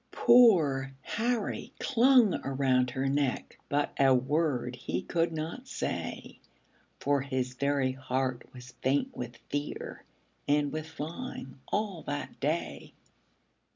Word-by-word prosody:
Poor 155 - +5
Harry 230 -1 -2
clung 245 -4 +4
around 130 -2 +2
her 130 +2 -2
neck, 140 -1 -1
But 145 +1 0
a 135 -1 +6
word 130 -2 0
he 95 -7 -3
could 165 0 0
not 160 +11 -5
say, - - -4 0.6
For 140 -1 +1
his 130 -2 -2
very 140 0 +1
heart 130 -1 -3
was 125 -1 -12
faint 145 - +1
with 120 -1 -6
fear, 145 +1 -4 0.4
And 145 0 +2
with 155 +1 -4
flying 160 - -7
all 205 -5 -2
that 145 0 -4
day. 155 +4 -2
145 Hz, 120 wpm, -30 LUFS, 130-165 Hz, 0.6 s, a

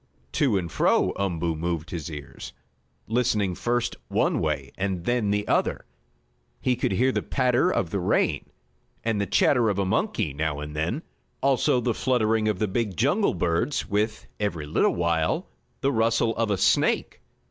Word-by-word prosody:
To 135 -8 +2
and 85 -3 -3
fro - - +2
Umboo 85 -4 -1
moved 85 +2 -3
his 85 -3 -4
ears, 75 -2 -8 0.5
listening 110 -5 +1
first 120 +5 -1
one - - +1
way - - -2
and 95 -3 -2
then 120 -4 +1
the 105 0 0
other. - - 0 0.7
He 125 - +1
could 120 - -1
hear 130 +7 +3
the - - -1
patter 130 +5 +2
of 90 - -1
the 100 - -1
rain, 90 - 0 0.5
and 110 -3 0
the 100 - -1
chatter 120 +4 +3
of 100 - -1
a 100 - +1
monkey 85 -5 0
now 75 0 -2
and 75 0 -7
then, 85 - -2 0.4
also 135 -2 +3
the 120 -1 0
fluttering 110 -4 +1
of 105 -3 +1
the 105 - 0
big 100 -2 -2
jungle 150 - +2
birds, 85 - 0
with, 105 +2 -1
every 95 -8 -2
little 75 - +2
while, 85 -2 0 0.3
the 140 - +2
rustle 115 -1 +2
of 115 -1 0
a 100 - +1
snake. - - +2
105 Hz, 170 wpm, -25 LUFS, 85-120 Hz, 0.7 s, hear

